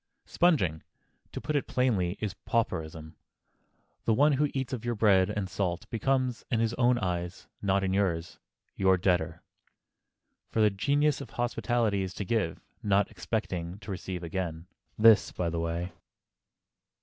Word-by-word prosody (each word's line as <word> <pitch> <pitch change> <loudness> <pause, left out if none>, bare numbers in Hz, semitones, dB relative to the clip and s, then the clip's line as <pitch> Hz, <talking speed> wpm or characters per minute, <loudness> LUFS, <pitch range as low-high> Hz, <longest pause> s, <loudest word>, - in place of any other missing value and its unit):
Sponging—to 115 - -1
put 155 - -3
it 145 - 0
plainly—is 105 -5 0
pauperism. 80 -8 -2 0.9
The 110 - +3
one 145 +5 +5
who 145 +1 +2
eats 135 -1 -3
of 120 -3 -4
your 120 0 -1
bread 100 -3 +4
and 105 -2 -2
salt 95 +2 -2
becomes, 130 +1 0
in 115 - +1
his 115 0 +1
own 120 0 +3
eyes—not 95 +1 -2
in 95 0 0
yours—your 95 0 -1
debtor. 85 -3 0 1.1
For - - -2
the 105 -1 +6
very 100 - -13
genius 145 +4 +2
of - - -8
hospitality 120 -3 0
is 95 -1 -4
to 100 - -4
give, 100 -6 0 0.2
not 100 0 +2
expecting 90 -3 -3
to - - -7
receive 90 -1 -5
again. 85 -1 -4 0.3
(This 110 0 +6
by 85 -2 -2
the 85 - -2
way!) 85 +2 -2
100 Hz, 140 wpm, -29 LUFS, 90-120 Hz, 1.1 s, the